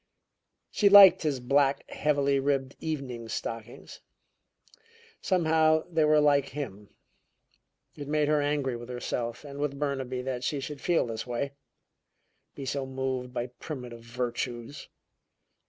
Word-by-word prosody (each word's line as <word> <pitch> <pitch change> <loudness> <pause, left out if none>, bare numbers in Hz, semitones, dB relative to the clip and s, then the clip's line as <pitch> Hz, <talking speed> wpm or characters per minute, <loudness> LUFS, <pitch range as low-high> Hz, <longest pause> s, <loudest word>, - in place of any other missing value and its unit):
She 205 - +4
liked 195 -2 +9
his 145 -5 -1
black, 140 +2 +1
heavily 140 -2 +1
ribbed 135 -1 -1
evening 130 -7 -5
stockings. 115 +1 -6 1.2
Somehow 160 -3 +3
they 160 -2 +2
were 155 0 +5
like 145 -2 +3
him. 105 -8 -7 1.1
It 145 -1 -8
made 150 0 +1
her 150 -1 +2
angry 145 -3 0
with 120 +1 -9
herself 120 0 -4
and 140 0 -8
with 145 -1 -2
Burnaby 135 -3 -2
that 130 -1 -4
she 145 +2 -1
should 140 +1 -7
feel 175 -6 +2
this 115 0 -5
way; 125 +3 -2 1.0
be 140 - -7
so 135 +1 -2
moved 130 -1 -3
by 120 -1 -2
"primitive 125 -6 -7
virtues." 120 +2 -5
140 Hz, 130 wpm, -28 LUFS, 125-150 Hz, 1.2 s, liked